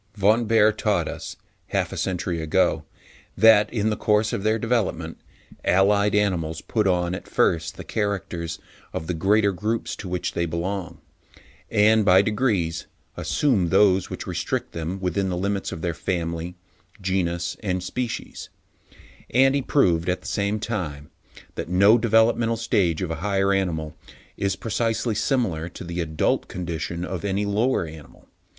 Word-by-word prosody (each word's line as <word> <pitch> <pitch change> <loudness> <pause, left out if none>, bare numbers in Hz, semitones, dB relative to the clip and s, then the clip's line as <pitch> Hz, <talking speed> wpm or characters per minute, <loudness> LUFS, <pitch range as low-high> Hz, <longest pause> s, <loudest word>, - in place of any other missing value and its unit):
Von 110 +4 +3
Baer 110 -1 +5
taught 105 -6 0
us, - - -6 0.3
half - - -1
a - - -5
century 90 -2 -2
ago, 80 -1 +1 0.5
that, 110 -1 +6
in 110 -2 0
the - - 0
course 105 0 +1
of - - -1
their 110 +2 +2
development, 115 -2 -1 0.4
allied 100 +2 +3
animals 90 -6 0
put 110 -3 0
on 90 -1 +1
at 90 - -6
first, 80 0 +1
the - - -7
characters 90 -6 -3 0.4
of 80 - -4
the 90 - -2
greater 100 +5 +3
groups 110 +5 -2
to 95 - -7
which 90 0 -2
they 85 - -1
belong, 90 +3 -3 0.7
and, 110 +1 +4
by 95 0 +6
degrees, 105 -7 0 0.3
assume 110 - +1
those 95 -1 +4
which - - -6
restrict - - -3
them 85 +4 -4
within 95 +1 -1
the 90 - -2
limits 100 +2 -2
of 80 - -7
their 85 -2 0
family, 85 0 -3 0.4
genus, 85 -3 -1
and 90 -3 -2
species; 120 +5 -5 0.8
and 135 +2 +4
he 140 - +1
proved, 90 - +2
at 90 - -1
the - - -18
same 100 +1 -1
time, 80 -11 -4 0.4
that - - -5
no 100 +6 +5
developmental 115 +1 +3
stage 95 -7 +1
of 85 - -3
a - - -1
higher 100 0 +1
animal 80 -5 -1 0.4
is 100 -1 -1
precisely 115 +2 -1
similar 105 - 0
to 90 - -9
the 85 0 -3
adult 80 -2 0
condition 85 0 -4
of 90 -2 -5
any 100 +1 0
lower 105 +1 +1
animal. 80 -2 -13
95 Hz, 155 wpm, -24 LUFS, 85-105 Hz, 0.8 s, that